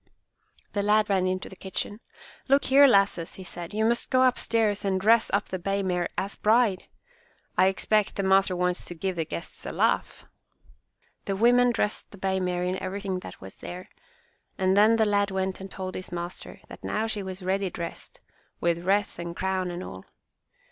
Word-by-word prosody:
The 205 - 0
lad 210 0 +3
ran 185 -1 +2
into 185 0 -2
the - - -11
kitchen. 190 +2 -5 0.5
"Look 275 +1 +4
here, 280 +1 +9
lasses," 195 -7 +2
he 190 - -9
said, 175 -1 -7
"you 220 +1 0
must 235 +1 0
go 255 0 +4
upstairs 225 -4 +1
and 190 -1 +1
dress 225 +3 +4
up 200 +1 0
the 185 - -3
bay 195 +2 -1
mare 180 -2 -1
as 195 +1 -2
bride. 215 -3 +2 0.7
I 185 +1 +5
expect 210 +2 +1
the 200 - -1
master 190 -1 +3
wants 180 0 0
to 175 - -7
give 190 +2 -2
the 165 -2 -1
guests 170 - -7
a - - -4
laugh!" - - 0 1.0
The 195 - -1
women 245 +4 +5
dressed 210 -2 -2
the 205 - -13
bay 190 0 0
mare 180 -1 -1
in 185 +1 -2
everything 190 0 -3
that - - -11
was 95 0 -11
there, 180 +1 -8 0.7
and 190 -1 +2
then 215 +3 +6
the 220 -1 +3
lad 205 -1 +2
went 190 0 -2
and 195 - -7
told 185 -1 -6
his 185 - -7
master 175 0 -6
that - - -12
now 215 - -1
she 220 -2 -2
was 190 -1 -7
ready 190 +1 0
dressed, 170 -1 -7 0.4
with 170 0 +1
wreath 200 0 +1
and 170 0 -5
crown 190 0 -1
and 175 +1 -5
all. 95 0 -9
190 Hz, 190 wpm, -27 LUFS, 185-210 Hz, 1.0 s, here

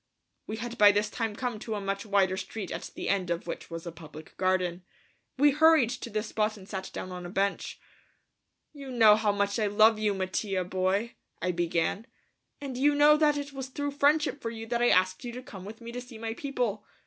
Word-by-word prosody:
We 215 - -4
had 235 +1 -6
by 205 -1 +9
this 205 +1 0
time 225 -3 -2
come 245 -3 -3
to 220 0 -4
a - - -2
much 195 +2 -3
wider 195 -2 +2
street 190 +1 -6
at - - -5
the - - -5
end 190 -3 0
of 170 0 -2
which 170 - -6
was 165 0 -7
a 170 - -5
public 155 -1 -12
garden. 185 -1 0 0.5
We 290 +2 +5
hurried 305 -4 +5
to 245 -1 -6
this 215 0 -3
spot 215 0 0
and 190 -1 -13
sat 190 -2 -5
down 185 - -6
on 180 0 -6
a 175 - -6
bench. 195 +1 -1 0.9
"You 280 -2 -9
know 225 -4 +6
how 215 -1 +1
much 200 +2 0
I 215 - +2
love 215 +2 +5
you, 210 -2 +1
Mattia 190 0 -1
boy," 190 +5 -1 0.3
I 180 - 0
began, 175 +4 -1 0.5
"and 270 -3 -6
you 290 +2 +4
know 295 +1 +7
that 300 -1 +3
it 285 -1 -5
was 265 -1 -5
through 285 +2 -3
friendship 290 0 +2
for 230 - -3
you 225 -1 -7
that 235 +1 -1
I 240 - +4
asked 185 0 +2
you 240 - -5
to 250 +1 -7
come 190 -6 -10
with 220 +3 -10
me 235 0 -7
to 245 +1 -5
see 245 -2 -11
my 225 0 -4
people. 240 -6 -2
215 Hz, 225 wpm, -28 LUFS, 190-245 Hz, 0.9 s, by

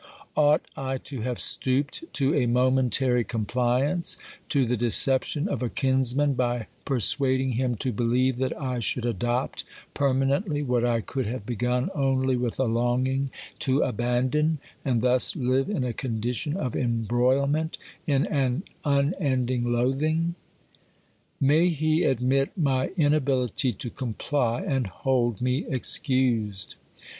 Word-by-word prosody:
Ought 150 0 +4
I 135 0 -3
to 130 -1 -7
have 125 +1 -3
stooped 140 - +1
to 140 +1 +2
a 135 -6 +2
momentary 125 0 +2
compliance, 125 - 0 0.3
to 140 -5 +3
the 120 +1 0
decep 120 +3 +3
tion 150 +4 -2
of 195 - -3
a 125 - -1
kinsman 135 +2 +2
by 120 -3 -1 0.2
persuading 130 +1 +2
him 125 0 0
to 130 +3 -2
believe 120 +3 +1
that 130 +4 -2
I 130 -4 -2
should 120 +1 -1
adopt 120 +2 -1 0.3
permanently 140 +4 +1
what 125 -3 0
I 120 -1 +1
could 130 +2 -3
have 115 -2 -5
begun 125 +2 -1
only 135 -2 +1
with 120 -1 -2
a - - +3
longing 125 +3 0 0.3
to 135 +2 +2
abandon, 125 +6 0 0.3
and 125 -4 0
thus 125 0 +3
live 130 0 0
in 200 -11 -1
a 125 -2 -2
condition 125 - -2
of 130 - -3
embroilment, 130 +6 +1 0.3
in 140 -2 +2
an 135 +2 0 0.2
unending 135 -5 0
loathing? 155 +8 +1 1.1
May 150 +5 +4
he 155 -1 +1
admit 135 +4 +1
my 135 -6 +1
inability 135 - +1
to 115 +4 -6
comply 125 0 -2
and 135 -5 -1
hold 120 +1 -1
me 125 +3 0
excused 125 -7 0
130 Hz, 130 wpm, -26 LUFS, 120-140 Hz, 1.1 s, Ought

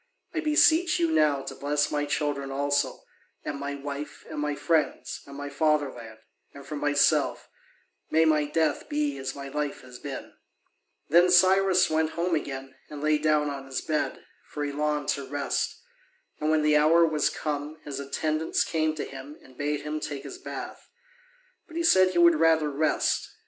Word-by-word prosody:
I 330 - -1
beseech 320 +3 +4
you 335 -2 +1
now 145 - +2
to - - -6
bless 145 +1 0
my 145 0 0
children 145 -2 -2
also, 140 0 -1 0.4
and 140 - -4
my 140 0 -4
wife, 140 +1 -7
and 155 - -5
my 150 0 -1
friends, 160 0 -1
and 140 0 -10
my 145 0 -5
fatherland; 140 -6 -1 0.4
and 140 -1 -11
for 150 +2 -6
myself, 145 0 +2 0.6
may 160 +1 +4
my 155 -1 +3
death 150 -1 0
be 145 -1 -1
as 135 0 -4
my 140 -1 -7
life 145 +1 -3
has 125 -1 -12
been." 140 -2 -7 0.8
Then 175 +4 +6
Cyrus 185 0 +5
went 155 0 0
home 170 +1 -1
again 135 -3 -3 0.2
and 150 - -7
lay 155 0 +3
down 150 -1 +2
on 135 -1 -7
his 130 -1 -3
bed, 155 -1 -2 0.2
for 145 -1 -4
he 145 - -3
longed 150 0 -1
to 140 -1 -1
rest. 140 +1 -2 0.6
And 155 - 0
when 155 -1 +3
the 150 0 +4
hour 165 +3 +5
was 155 -2 +1
come, 150 0 -4
his 140 -2 -5
attendants 155 +3 -1
came 155 -1 0
to 155 - -4
him 135 +2 -10
and 130 - -18
bade 145 +2 -2
him 150 +1 -4
take 145 -2 -5
his 365 - -9
bath. - - -8 0.8
But 330 - -9
he 335 - 0
said 185 - +5
he - - -2
would 170 -2 +6
rather 160 -2 +3
rest. 155 +3 0
150 Hz, 180 wpm, -27 LUFS, 140-160 Hz, 0.8 s, Then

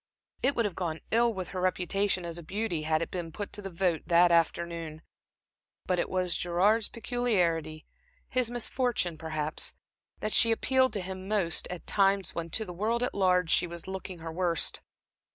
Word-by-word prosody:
It 270 +3 +2
would 235 - +1
have 205 - -2
gone 165 -3 -3
ill 235 +1 +4
with 190 -5 -5
her 185 - -4
reputation 185 +1 0
as 170 0 -5
a - - -9
beauty 195 -1 -2
had 155 +1 +1
it - - -7
been 175 -3 -4
put 205 +5 -6
to 205 - -3
the 195 - -5
vote 175 -2 0
that 175 0 +5
afternoon. 170 -1 0 0.8
But 180 -1 0
it - - -1
was 185 -2 0
Gerard's 200 +6 +2
peculiarity, 180 -10 -1 0.4
his 255 -2 0
misfortune 240 -6 +1
perhaps, 155 -1 -3 0.4
that 215 - -2
she 230 - +7
appealed 260 +3 +2
to 200 - -1
him 185 +1 -7
most 195 -5 +1
at 180 -1 -7
times 195 -1 +2
when 170 0 -4
to 220 +6 -2
the 180 - -7
world 225 +6 0
at 250 - -1
large 180 -3 +2
she - - +4
was 170 0 -8
looking 190 -1 -6
her 165 0 -7
worst. 170 -1 0
185 Hz, 185 wpm, -29 LUFS, 170-210 Hz, 0.8 s, she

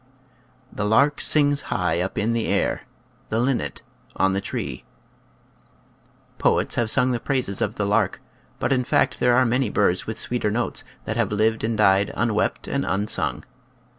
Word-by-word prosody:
" - - -33 0.3
The 105 - -3
lark 140 +8 +2
sings 145 -2 +4
high 90 -1 0
up 95 - -4
in 110 +3 0
the 115 -1 -1
air, - - -1 0.4
The 110 - -1
linnet 120 - -1 0.3
on 95 0 +2
the 95 - -1
tree." - - -5 1.6
Poets - - +1
have 115 -2 0
sung 130 +2 +3
the 120 - -1
praises 125 -7 -1
of - - -1
the - - -1
lark, - - +1 0.4
but 130 - 0
in 125 -1 +1
fact 125 +1 +1
there 125 0 +3
are 130 +1 +4
many 125 0 +1
birds 95 -3 +1
with 110 - -4
sweeter 120 -3 0
notes 115 +3 -2 0.2
that 110 - -3
have 115 -4 0
lived 110 +1 +1
and 110 0 -1
died 100 -1 +3
"unwept 110 -2 -1
and - - -1
unsung." 100 +2 -1
110 Hz, 170 wpm, -23 LUFS, 105-125 Hz, 1.6 s, sings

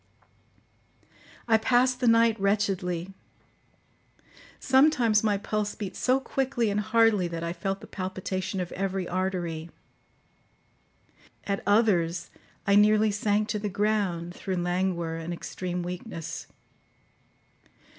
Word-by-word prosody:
I 225 -1 +4
passed 250 +2 +2
the 250 - +1
night 230 -1 +5
wretchedly. 195 -3 0 1.5
Sometimes 255 -6 +4
my 210 -2 +2
pulse 210 +1 -2
beat 200 -3 -6
so 260 +1 +2
quickly 265 -4 -1
and 205 - 0
hardly 215 -3 +3
that 170 -1 -5
I 170 0 -2
felt 195 +3 -3
the - - -9
palpitation 190 0 -4
of 180 -1 -4
every 190 -1 -2
artery; 175 -3 -2 1.7
at 200 -1 -2
others, 195 -6 +2 0.3
I 200 - +3
nearly 215 +1 +5
sank 205 +1 0
to 210 - -1
the 210 0 -3
ground 195 -4 -1
through 190 0 -4
languor 175 -2 -1
and 165 +1 -5
extreme 180 +1 -4
weakness. 175 -2 -6
200 Hz, 115 wpm, -27 LUFS, 180-215 Hz, 1.7 s, night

